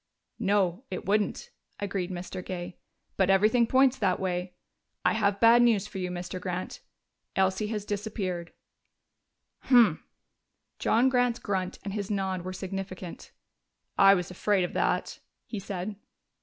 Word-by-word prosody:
"No, 200 -1 +1
it - - -5
wouldn't," 205 +1 0 0.3
agreed 195 -3 -2
Mr. 180 0 -6
Gay. 180 -1 -6 0.4
"But 190 -1 +3
everything 215 +5 +4
points 265 +1 +4
that 190 -3 +1
way. 180 -1 -3 0.5
We - - +4
have 200 0 +1
bad 235 +1 +7
news 225 -5 +3
for 195 - -7
you, 180 -1 -2
Mr. 180 +1 -5
Grant: 180 0 -4 0.6
Elsie 190 +2 +1
has 210 -2 -3
disappeared." 195 -5 -3 1.1
"Humph!" 245 -4 +4 0.8
John 235 +4 +3
Grant's 245 -2 +2
grunt 190 -4 -2
and 195 0 -4
his 200 -2 -3
nod 190 -3 -1
were 185 +1 -5
significant. 185 -1 -6 0.6
"I 195 0 +7
was 180 -1 -3
afraid 195 +1 +1
of 175 - -3
that," - - 0 0.3
he 215 - -5
said. 195 +1 -5
195 Hz, 140 wpm, -28 LUFS, 185-215 Hz, 1.1 s, bad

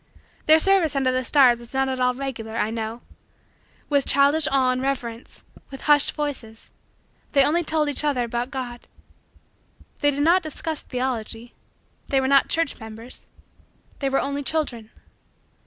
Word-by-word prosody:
Their 310 +1 +8
service 350 -3 +2
under 265 -2 +2
the 255 0 -1
stars 250 -2 +4
was 235 +2 -12
not 270 0 +2
at 260 -1 -3
all 250 0 +2
regular, 230 -5 -5
I 220 - 0
know. 225 +1 -5 0.8
With 285 -2 +1
childish 285 +2 +4
awe 260 -2 +3
and 255 0 -2
reverence 245 -4 -4 0.3
with 270 - -10
hushed 295 -1 +4
voices 265 -7 -5 0.6
they 275 - +5
only 335 +5 +2
told 310 -1 0
each 290 +1 -1
other 280 -5 +1
about 240 +1 -3
God. 250 -3 -7 1.1
They 290 - +3
did 285 0 0
not 345 +4 +4
discuss 315 0 -4
theology 240 -2 -4 0.5
they 270 - +2
were 265 - 0
not 275 0 +4
church 330 -3 0
members 225 +2 -10 0.7
they 275 - 0
were 270 - +1
only 280 +1 -2
children. 270 -7 -2
270 Hz, 155 wpm, -23 LUFS, 240-290 Hz, 1.1 s, Their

